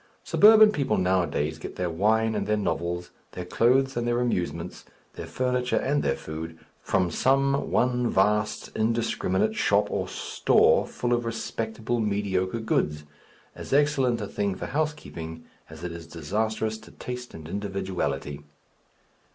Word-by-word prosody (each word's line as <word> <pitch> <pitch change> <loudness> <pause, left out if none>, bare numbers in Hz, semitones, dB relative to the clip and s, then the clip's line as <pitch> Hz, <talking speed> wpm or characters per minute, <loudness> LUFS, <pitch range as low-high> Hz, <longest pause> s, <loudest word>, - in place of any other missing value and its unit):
Suburban 215 0 +7
people 140 -8 0
nowadays 90 -4 0
get - - -7
their 90 -2 -2
wine 110 +6 +2
and - - -2
their 105 0 +2
novels, 85 -3 -2 0.2
their 90 - -6
clothes 130 +8 +2
and 120 0 -1
their 120 0 +1
amusements, 90 -8 -2 0.3
their - - -7
furniture 125 -1 0
and 145 +2 +1
their 70 - +1
food, 80 +1 -7 0.2
from 90 -2 0
some 135 - +2
one 125 -1 +1
vast 105 +2 +1
indiscriminate 110 -2 0
shop 105 0 +2
or - - -1
"store" - - +2
full 120 0 -2
of 120 0 +1
respectable 115 0 -3
mediocre 100 -1 -1
goods, 75 -8 0 0.5
as - - -6
excellent 135 -4 +3
a - - -2
thing 100 -1 -2
for - - -5
housekeeping 130 - -4 0.2
as 80 +1 -11
it 90 - -4
is 85 -1 -9
disastrous 110 +7 -2
to 110 - -15
taste 125 0 -7
and 80 -1 -9
individuality. 95 -8 -3
105 Hz, 145 wpm, -26 LUFS, 90-120 Hz, 0.5 s, Suburban